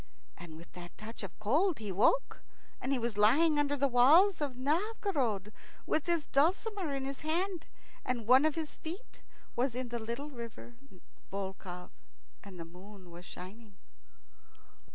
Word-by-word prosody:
And 165 -2 -10
with 170 +2 -13
that 175 -1 -10
touch 220 +2 -8
of 195 -4 -8
cold 300 - +2
he 210 -3 -5
woke, 230 - +2 0.4
and 260 - -2
he 275 - +3
was 235 -3 -2
lying 295 +9 +5
under 290 0 +2
the 280 +1 +3
walls 300 +10 +6
of 275 -4 -2
Novgorod, 280 - 0 0.3
with 310 +1 0
his 340 -3 +2
dulcimer 365 +4 +1
in 270 -1 -3
his 275 0 -4
hand, 345 +3 -1 0.4
and 240 -3 -2
one 255 +4 +7
of 310 -1 +2
his 320 -2 -4
feet 355 +10 -7 0.4
was 245 0 +1
in 255 -1 -3
the 235 0 -3
little 235 +7 -5
river 235 -1 -8 0.6
Volkhov, 190 -2 -6 0.5
and 190 -3 -11
the 165 - -5
moon 185 +1 -13
was 175 +1 -11
shining. 200 +4 -10
250 Hz, 155 wpm, -32 LUFS, 205-310 Hz, 0.6 s, one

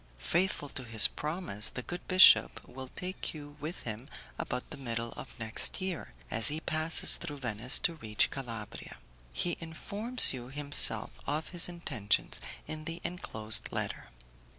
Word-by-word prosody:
Faithful 170 - -1
to 135 - -8
his 115 -3 +4
promise, 150 - -3
the 125 - -6
good 175 +5 -7
bishop 185 +1 +5
will 130 +1 -9
take 180 +5 -6
you 145 -1 -11
with 155 +5 -7
him 115 +3 -7 0.3
about 125 0 -4
the - - -7
middle 115 -3 -5
of - - -11
next 110 -1 -1
year, 185 -2 -5 0.2
as 110 - +2
he 150 +2 0
passes 160 0 +4
through 145 - -7
Venice 120 0 +1
to 170 - -1
reach 110 -9 -1
Calabria. 115 -6 -8 0.3
He 175 - -3
informs 200 - +5
you 125 -2 -8
himself 145 - +3 0.2
of 155 +2 -3
his 175 -1 +3
intentions 135 - -2 0.2
in 155 0 -7
the 165 +1 -6
enclosed 110 -11 0
letter. - - -4
145 Hz, 150 wpm, -30 LUFS, 115-170 Hz, 0.3 s, bishop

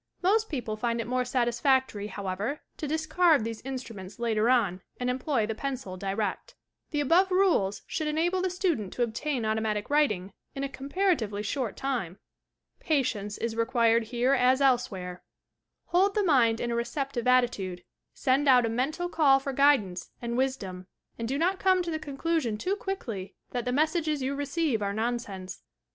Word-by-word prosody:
Most 435 +4 +3
people 245 -8 -3
find 235 +1 -1
it 230 - -2
more 250 +1 0
satisfactory, 245 -3 +1
however, 200 +7 -4 0.2
to 305 - -4
discard 315 -1 +3
these 225 -1 -5
instruments 230 -8 -7
later 230 -1 +1
on, 205 -8 +2 0.2
and 250 0 0
employ 255 -2 0
the 225 - -2
pencil 260 -5 -4
direct. 195 +2 -3 0.3
The 295 -2 0
above 345 +7 +4
rules 365 - +2
should 310 - -3
enable 340 +5 +1
the 375 - 0
student 345 - -1
to 245 - 0
obtain 240 +2 -2
automatic 215 +1 -1
writing 210 -11 +1 0.2
in 275 - -3
a 275 - -2
comparatively 270 - -1
short 240 +1 -2
time. 240 -10 -2 0.6
Patience 220 - -1
is 230 -1 -3
required 230 -1 +2
here 245 +3 +1
as 255 0 +4
elsewhere. 200 -10 0 0.7
Hold 380 +4 +3
the 420 - +2
mind 240 -10 +4
in 240 - -2
a - - 0
receptive 250 0 -2
attitude, 210 -8 +2 0.3
send 275 +2 +2
out 250 -3 +6
a - - 0
mental 275 +10 -1
call 290 -6 +4
for 270 0 -4
guid 280 -1 +5
ance 180 -2 -8
and 235 0 -3
wisdom, 200 -9 -2 0.3
and 230 - -2
do 270 +3 -1
not 370 +5 +1
come 370 -1 +3
to 340 - -3
the 315 - -2
conclusion 290 -5 -1
too 370 - -1
quickly 240 - -5 0.2
that 245 -2 -3
the 250 - 0
messages 310 0 +1
you 270 +2 -1
receive 285 -3 -1
are 200 0 -1
nonsense. 215 -4 -3
250 Hz, 170 wpm, -28 LUFS, 220-300 Hz, 0.7 s, out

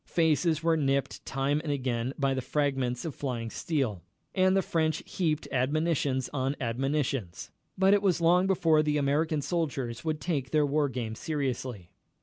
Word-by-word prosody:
Faces 160 -1 +2
were 165 0 +3
nipped 140 -3 0
time 135 +2 0
and 155 - -2
again 125 -3 -1
by 135 -2 +1
the 130 - -1
fragments 135 -2 -1
of 160 - -3
flying 120 -5 -4
steel, 130 - -1 0.3
and 185 0 +3
the 190 - +2
French 160 -1 0
heaped 155 -4 -1
admonitions 140 -1 +1
on 135 0 -1
admonitions, 130 - -2 0.3
but 190 +1 +5
it 205 - +4
was 190 -4 +2
long 175 +3 +4
before 165 -5 +3
the 150 -1 +1
American 145 +2 +1
soldiers 135 -9 -2
would 155 -2 -1
take 145 -7 -2
their 150 0 +3
war 145 0 +1
game 120 -4 -4
seriously. 130 - -3
145 Hz, 160 wpm, -29 LUFS, 130-160 Hz, 0.3 s, but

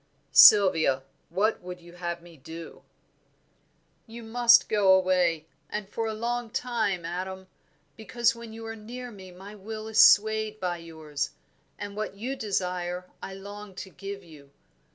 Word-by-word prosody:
"Sylvia, 140 -2 +7 0.3
what 200 +6 0
would 180 0 -8
you 170 0 -15
have 175 -1 -5
me 175 -1 -15
do?" 160 +3 -10 1.3
"You 230 +1 -10
must 235 +1 +5
go 205 -3 +3
away, 180 -4 +2 0.2
and 210 -1 -4
for 225 +2 -3
a 220 - -2
long 240 +1 -3
time, 220 -7 -1
Adam; 190 +2 -5 0.5
because 230 +2 0
when 235 -1 -10
you 225 0 -9
are 225 0 -6
near 240 +3 -8
me 190 -3 -12
my 190 +3 -11
will 215 +2 -7
is 220 0 +6
swayed 215 0 +4
by 180 -2 -2
yours, 155 -4 -5 0.5
and 205 0 -7
what 215 -1 -4
you 250 +6 -4
desire 180 -5 -3
I 190 - -7
long 200 0 -10
to 190 0 -8
give 195 +1 -8
you. 150 -5 -15
195 Hz, 155 wpm, -27 LUFS, 175-220 Hz, 1.3 s, Sylvia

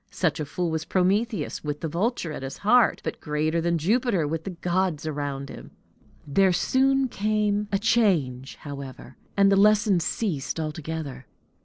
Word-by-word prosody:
Such 180 -5 -1
a 150 - -2
fool 165 +4 -2
was 160 0 -2
Prometheus, 195 - 0
with 150 -1 -4
the 165 - -2
vulture 175 - -1
at 150 - -6
his 135 +1 -6
heart 245 +2 +4
but - - -5
greater 155 +2 0
than 170 0 +1
Jupiter 200 - +1
with 160 +4 -4
his 185 - -5
gods 180 -3 0
around 140 -2 -4
him. - - -10 0.6
There 190 +6 +3
soon 265 +8 +2
came 210 -2 0
a 200 - +2
change, 165 - +1
however, 140 -3 -9 0.2
and 200 0 +5
the - - +5
lessons 205 -3 +4
ceased 165 -9 -2
altogether. 155 -4 -5
170 Hz, 160 wpm, -25 LUFS, 150-205 Hz, 0.6 s, and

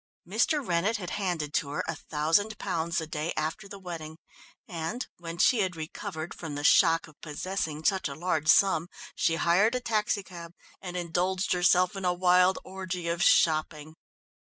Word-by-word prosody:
Mr. 240 - +1
Rennett 180 +6 +1
had 180 -4 -6
handed 175 -7 -2
to 140 - 0
her 145 - -2
a - - -1
thousand 165 +8 0
pounds 170 -3 -2
the 160 - 0
day 155 +1 -3
after 160 +7 -3
the 200 - -9
wedding, 165 -4 -7 0.5
and 170 +8 -4
when 170 -1 -7
she 240 +6 +4
had 185 -3 0
recovered 160 0 -6
from 160 -4 -7
the 145 - -4
shock 165 +1 +5
of 155 - -20
possessing 160 0 -4
such 190 -3 +2
a 140 - -7
large 160 -2 -1
sum, 170 0 +4 0.3
she 165 - +1
hired 190 +8 +3
a - - +1
taxicab 200 -7 -2 0.3
and 180 -1 -6
indulged 180 +2 0
herself 180 +1 +3
in 195 - -5
a 180 -1 +1
wild 180 +1 +4
orgy 185 -2 -5
of 170 0 -1
shopping. 155 -2 +2
175 Hz, 170 wpm, -28 LUFS, 160-190 Hz, 0.5 s, shock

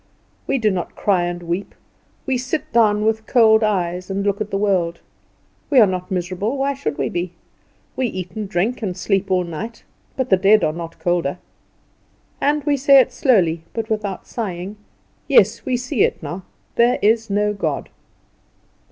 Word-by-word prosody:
We - - +1
do 215 -4 +2
not 180 -2 -4
cry 185 -4 +1
and 175 0 -4
weep: 175 +4 -4 0.5
we 265 - 0
sit 255 +4 -3
down 215 -2 +3
with 220 0 0
cold 220 -3 +5
eyes 180 -3 -1
and 195 +1 -2
look 200 +1 0
at 210 - -2
the 195 - -1
world. 185 -4 0 0.7
We 280 -4 +5
are 220 - +8
not 185 -2 -3
miserable. 185 +7 -2
Why 275 +1 0
should 150 - -4
we - - 0
be? 175 0 -3 0.6
We 260 - 0
eat 185 -5 -5
and 210 +1 -5
drink, 215 +7 -1
and 190 -4 -3
sleep 195 +1 0
all 185 -1 +2
night; 180 +8 -7 0.3
but 260 -3 -2
the 190 - +6
dead 200 +1 +4
are 155 - +1
not 165 0 -7
colder. 175 -3 -1 1.0
And 295 +1 +1
we 285 0 +1
say 275 +1 +6
it 260 - +2
slowly, 175 - +2
but 225 -1 -4
without 210 -3 -3
sighing, 195 -3 -5 0.5
"Yes, 230 -5 +4
we 255 - +1
see 250 -1 -2
it - - -1
now; 180 +1 -6 0.3
there 235 +1 +4
is 225 +1 +3
no 210 +1 +1
God." 200 - -3
205 Hz, 180 wpm, -20 LUFS, 180-230 Hz, 1.0 s, are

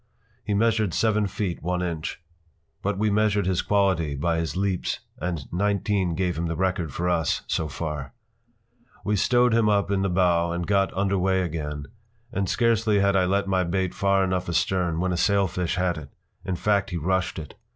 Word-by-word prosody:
He 105 - -1
measured 110 -3 +2
seven 105 -2 +2
feet 95 -3 -3
one 90 +1 -1
inch. 85 -2 -4 0.6
But 100 0 -1
we 105 +1 +1
measured 105 -1 +2
his 95 -1 +1
quality 95 -7 +1
by 80 +4 0
his 80 -1 -3
leaps 95 -2 -1 0.2
and 85 -3 -3
nineteen 100 -2 0
gave 90 -2 -1
him 85 - -1
the 85 - -2
record 90 -3 -1
for 85 +5 -2
us 85 -4 +1
so 80 - -1
far. 75 -2 -5 0.9
We 105 - +1
stowed 120 +4 +3
him 115 -2 +3
up 100 -1 +2
in 100 -1 +1
the 95 - +1
bow 85 -2 +2
and 85 0 -2
got 100 0 +2
under 100 0 +1
way 95 0 +2
again, 75 -4 -4 0.5
and 95 -2 -1
scarcely 115 -3 +2
had 100 0 +3
I 95 -1 +4
let 100 +2 +1
my 95 -1 +2
bait 95 +1 -1
far 100 0 +2
enough 90 -1 -1
astern 85 -1 0
when 90 +1 0
a - - -1
sailfish 95 -2 +1
hit 90 -2 0
it. 70 -3 -11 0.3
In 95 - -2
fact, 100 +2 +1
he 90 - -3
rushed 95 +3 0
it. 75 -4 -7
95 Hz, 190 wpm, -25 LUFS, 85-100 Hz, 0.9 s, I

